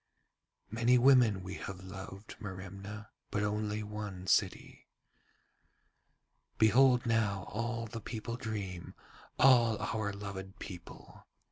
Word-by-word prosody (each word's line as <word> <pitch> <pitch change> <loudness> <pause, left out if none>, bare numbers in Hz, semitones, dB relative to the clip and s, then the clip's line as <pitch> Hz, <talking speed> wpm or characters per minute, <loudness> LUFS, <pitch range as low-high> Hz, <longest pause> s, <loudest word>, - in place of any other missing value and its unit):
'Many 115 +3 +4
women 125 -4 +6 0.2
have 95 -1 -7
we - - -10
loved, 95 +2 -9
Merimna, 100 +1 -8 0.2
but 105 - -1
only 105 0 -1
one 105 -3 -6
city. 90 - 0 1.7
'Behold 125 +3 +5
now 110 -5 +1
all 115 +3 -3
the 115 +1 -7
people 115 +2 -5
dream, 100 -7 -5 0.4
all 120 -4 +6
our 110 -1 -2
loved 100 0 -7
people. 90 -5 -11
105 Hz, 105 wpm, -33 LUFS, 100-115 Hz, 1.7 s, women